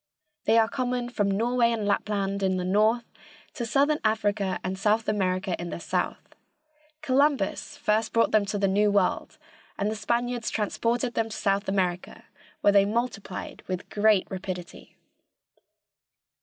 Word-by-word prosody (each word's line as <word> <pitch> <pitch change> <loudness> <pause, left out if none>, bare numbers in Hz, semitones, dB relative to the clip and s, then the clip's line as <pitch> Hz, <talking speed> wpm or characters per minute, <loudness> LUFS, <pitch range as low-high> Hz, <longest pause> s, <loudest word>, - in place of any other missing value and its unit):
They 225 +2 +4
are 225 -1 +5
common 245 0 -2
from 205 -4 0
Norway 235 +4 +2
and 220 -3 -2
Lapland 200 -1 -1
in 190 -1 +1
the 180 - -2
north 215 +5 +2 0.5
to 235 - -4
Southern 285 +5 +2
Africa 205 -3 0
and 185 +1 -2
South 215 +3 +1
America 185 -3 0
in 175 - -5
the - - -5
south. - - -3 0.7
Columbus 275 -5 +1
first 215 +1 0
brought 230 - +2
them 215 -1 +4
to 205 - -2
the 200 -1 +2
New 205 +2 +3
World, 200 -3 0 0.4
and 205 +2 0
the - - -3
Spaniards 235 +2 -1
transported 235 +3 -1
them 225 0 -1
to 215 - -6
South 200 0 0
America, 180 -2 -2 0.4
where 205 - +4
they 200 -1 +6
multiplied 210 -2 -3
with 185 -1 -5
great 210 -2 +3
rapidity. 185 -2 -7
210 Hz, 150 wpm, -26 LUFS, 195-230 Hz, 0.7 s, they